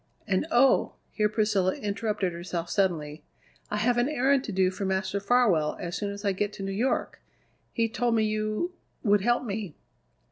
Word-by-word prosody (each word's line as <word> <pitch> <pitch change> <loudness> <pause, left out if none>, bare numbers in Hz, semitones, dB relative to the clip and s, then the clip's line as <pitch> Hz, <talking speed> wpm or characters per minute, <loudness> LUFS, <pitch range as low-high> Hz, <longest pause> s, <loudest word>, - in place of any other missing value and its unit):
And 195 +9 0
oh!" 265 -1 +4 0.2
here 210 -1 +1
Priscilla 210 -3 +1
interrupted 205 -3 -2
herself 170 0 -4
suddenly 155 -6 0 0.5
"I 210 - -2
have 240 +3 +2
an 245 +4 +2
errand 275 -1 +2
to - - -4
do 185 -1 +2
for 190 - -5
Master 190 +1 -1
Farwell 200 -8 +2
as 175 0 -4
soon 205 - -2
as 200 +1 -7
I 200 - +3
get 205 +2 -1
to 195 - -7
New 195 - -3
York. 235 +7 -1 0.5
He 230 -1 +1
told 240 0 0
me 220 - +3
you 215 +10 -1 0.3
would 205 -2 +4
help 240 +4 +2
me." 200 -7 -4
205 Hz, 180 wpm, -27 LUFS, 190-230 Hz, 0.5 s, oh